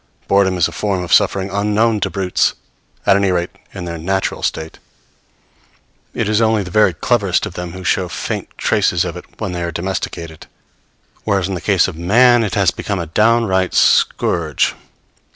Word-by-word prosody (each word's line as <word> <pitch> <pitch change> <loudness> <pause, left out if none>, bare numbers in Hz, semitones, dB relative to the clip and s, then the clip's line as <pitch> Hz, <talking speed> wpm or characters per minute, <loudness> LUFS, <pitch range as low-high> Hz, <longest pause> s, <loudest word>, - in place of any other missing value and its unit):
Boredom 95 -2 +2
is 85 - +3
a - - -9
form 95 +2 -2
of 85 - -2
suffering 95 0 +2
unknown 105 +2 +1
to - - -1
brutes, 95 -2 0 0.5
at 95 - +5
any 100 0 +2
rate 85 0 -1 0.2
in 95 -3 -7
their 85 -1 -5
natural 95 +4 -2
state; 80 0 -3 1.4
it - - -1
is 110 +1 +2
only 110 -2 +2
the 90 - -9
very 105 -1 +4
cleverest 100 0 +1
of - - -7
them 90 -1 -6
who 95 0 -8
show 90 0 0
faint - - -4
traces - - +1
of - - -5
it - - -9
when - - -3
they 90 -1 -4
are 85 0 -2
domesticated; 85 -2 -5 0.8
whereas 100 -4 0
in 95 - -4
the 90 - -4
case 95 -2 +2
of 95 - -6
man 120 +7 +4
it 105 - -2
has 95 -3 +3
become 100 - -4
a 85 - -3
downright 105 +1 +1
scourge. 80 -4 +2
95 Hz, 180 wpm, -17 LUFS, 85-105 Hz, 1.4 s, at